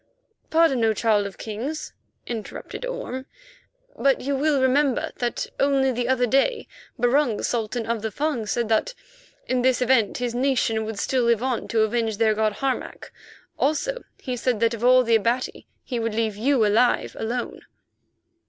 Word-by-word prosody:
"Pardon, 315 -7 +3
O 220 -1 +3
Child 210 -3 +2
of 195 - -11
Kings," 240 +9 -5 0.3
interrupted 235 - -6
Orme, 275 - -5 0.7
"but 275 -1 +2
you 280 +1 -2
will 285 +1 +2
remember 260 0 +2
that 240 -1 -2
only 275 -1 +3
the 245 0 -2
other 255 -1 +2
day 275 - +1 0.3
Barung, 245 -1 +2
Sultan 230 0 -2
of 230 -1 -2
the 220 - -2
Fung, 260 -1 -2
said 235 +1 -1
that 365 - +1 0.5
in 255 -1 0
this 255 0 +3
event 250 -4 +2
his 245 -2 -2
nation 240 -4 +1
would 220 -1 -5
still 260 +4 0
live 235 0 +2
on 255 -2 -1
to 225 -1 +1
avenge 220 -1 0
their 220 -1 +3
god, 215 0 +1
Harmac. 270 +2 -4 0.5
Also - - 0 0.2
he 255 -2 -4
said 245 -2 -1
that 230 +1 +2
of 230 0 -6
all 255 +1 +6
the 230 -1 +1
Abati 235 +4 -1 0.2
he 245 -3 -3
would 225 -1 -2
leave 220 -2 0
you 240 +1 +2
alive 225 +4 +2
alone." 240 +2 -3
245 Hz, 165 wpm, -24 LUFS, 225-270 Hz, 0.7 s, all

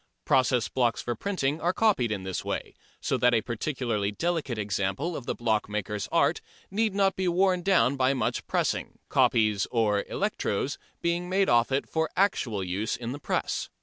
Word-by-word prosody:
Process 125 -3 +3
blocks 120 -3 +1
for 120 - -2
printing 155 - -2
are 175 +2 +1
copied 190 - +2
in 100 -3 -3
this 95 -1 -3
way, - - -4 0.3
so - - 0
that 125 -1 +4
a 110 - +3
particularly 120 -4 -2
delicate 160 -1 -2
example 105 - -1
of 125 - -7
the - - -1
blockmaker's 105 -3 -1
art - - +2 0.3
need 215 0 0
not 195 -1 +3
be 185 -1 -1
worn 180 +1 +2
down 175 -8 +3
by 130 +1 +2
much 125 -4 -2
pressing, - - -1
copies 105 -3 +3
or 105 -4 +1
"electros" - - -2 0.2
being 170 +1 0
made 190 +1 +2
off 120 +2 +3
it 135 +1 0
for 160 0 -1
actual 125 - +1
use 95 +4 -2
in 120 0 -5
the 145 - -6
press. 140 - -2
125 Hz, 175 wpm, -27 LUFS, 110-175 Hz, 0.3 s, that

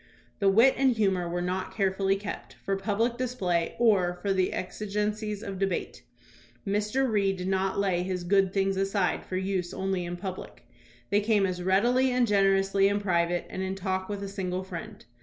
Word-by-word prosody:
The 200 - +4
wit 230 +7 +6
and 265 -1 +4
humor 190 -6 +1
were 175 +1 -2
not 185 +1 -3
carefully 195 -1 +1
kept 200 +1 -7
for 195 - +1
public 220 +4 0
display 185 -10 -1
or 190 -7 +3
for 200 -1 +1
the 185 -1 +1
exigencies 210 +2 -3
of 195 -3 -5
debate. 195 -2 -2 0.6
Mr. 210 +6 0
Reed 200 -4 +1
did 180 0 -4
not 190 0 0
lay 190 -3 +1
his 180 -1 -3
"good 195 +1 +3
things" 195 0 0
aside 195 -1 0
for 185 - -4
use 190 -1 -2
only 190 -1 -1
in 175 0 -5
public. 185 0 -7 0.4
They 205 - +4
came 210 -2 +2
as 180 -1 -3
readily 240 +8 +3
and 250 -1 +3
generously 195 -1 +3
in 200 +1 +1
private 175 -3 0
and 190 - -5
in 190 0 -2
talk 190 0 -2
with 200 -1 -4
a - - -3
single 190 -2 -3
friend. 175 -3 -8
195 Hz, 180 wpm, -28 LUFS, 185-205 Hz, 0.6 s, wit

